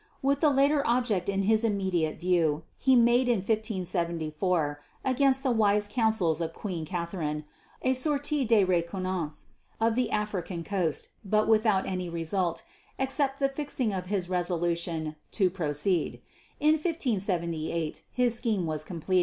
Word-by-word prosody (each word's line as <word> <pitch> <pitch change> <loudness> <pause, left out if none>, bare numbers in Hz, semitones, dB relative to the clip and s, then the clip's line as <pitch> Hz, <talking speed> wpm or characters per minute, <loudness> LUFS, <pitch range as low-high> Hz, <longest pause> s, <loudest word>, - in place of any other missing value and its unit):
With 280 +1 +2
the 305 - +4
latter 280 +1 +3
object 235 -6 +1
in 195 0 0
his 220 +2 +3
immediate 190 -8 0
view, 165 -3 +1 0.2
he 265 -1 +4
made 240 +1 +4
in 240 - +4
1574, 180 -6 -1 0.2
against 265 0 +2
the 265 - +2
wise 210 -2 +3
counsels 205 -8 +1
of 165 0 -2
Queen 175 -6 -4
Catherine, 170 -3 -3 0.4
a 260 - +3
sortie 290 +1 +1
de 225 -4 +4
reconnaissance 180 -3 -1 0.3
of 225 0 +3
the 250 +1 0
African 195 -5 -2
coast; 175 -5 -1
but 215 +1 +2
without 215 -3 +3
any 180 -2 -3
result 170 +1 -1 0.3
except 270 +1 0
the 275 -1 +2
fixing 270 -5 -2
of 180 -1 -4
his 190 -3 -1
resolution 170 -3 -1 0.2
to 190 -4 +2
proceed. 165 0 -1 0.4
In 300 +1 +4
1578 175 - -1
his 245 -2 +2
scheme 220 -6 0
was 155 -1 -2
complete. 180 +3 0
195 Hz, 140 wpm, -28 LUFS, 170-235 Hz, 0.4 s, the